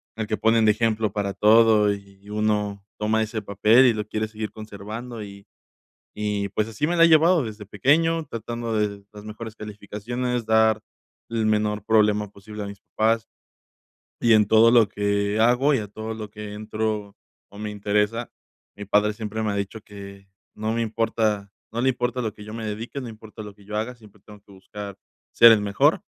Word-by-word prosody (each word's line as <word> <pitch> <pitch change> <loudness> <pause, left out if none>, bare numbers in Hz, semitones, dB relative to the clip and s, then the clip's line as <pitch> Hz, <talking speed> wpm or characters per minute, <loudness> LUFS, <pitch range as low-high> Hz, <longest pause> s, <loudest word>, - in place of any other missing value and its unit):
el 110 0 -3
que 110 - -1
ponen 115 0 +3
de 105 - +6
ejemplo 110 -1 0
para 100 -2 -2
todo 110 -1 +5
y 100 0 -13
uno 105 -1 -1
toma 110 +1 +1
ese 110 0 -3
papel 105 +5 +4
y 120 - +4
lo 105 -1 -4
quiere 110 0 -2
seguir 110 -1 -5
conservando 110 +2 -8
y 100 0 -11 0.7
y 105 -1 -1
pues, 105 +2 -1
así 115 +8 -2
me 175 - 0
la 165 - +7
he - - +7
llevado 165 -1 +5
desde 105 -1 -7
pequeño, 160 +9 +2
tratando 115 0 -4
de 100 -1 -2
las 105 0 -11
mejores 110 +1 -8
calificaciones, 110 +3 -4
dar 110 -1 +4 0.5
el 115 -1 -1
menor 105 -1 0
problema 105 -2 +3
posible 105 +1 -9
a - - -6
mis 100 -1 -9
papás. 110 +1 0 0.9
Y 115 -1 +4
en 105 -2 +5
todo 110 +2 +6
lo 115 -3 +6
que 100 +1 0
hago 125 +6 +4
y - - +2
a 105 - -5
todo 110 +2 -6
lo 105 -2 -7
que 105 -1 -8
entro 105 -1 -3 0.4
o 100 - -12
me 105 0 -4
interesa. 105 +3 -1 0.4
Mi 105 - -8
padre 105 +1 +2
siempre 110 0 -4
me 105 - 0
ha - - -2
dicho 100 +2 -4
que 100 -1 -12 0.3
no 110 +1 -2
me 115 - 0
importa, 110 -3 -1 0.2
no 120 +2 -2
le 130 - +3
importa 125 0 -1
a - - -3
lo 110 - -3
que 105 -1 -12
yo 105 +1 -8
me 115 -1 -5
dedique, 110 +6 -5
no 125 - -7
importa 110 0 -11
lo 105 - -9
que 100 0 -20
yo 105 0 -4
haga, 115 +4 -2
siempre 105 -2 -19
tengo 105 -1 -14
que 100 - -21
buscar 100 +1 -9 0.3
ser 115 0 +8
el 110 - +4
mejor. 100 -1 +2
110 Hz, 200 wpm, -24 LUFS, 105-115 Hz, 0.9 s, ser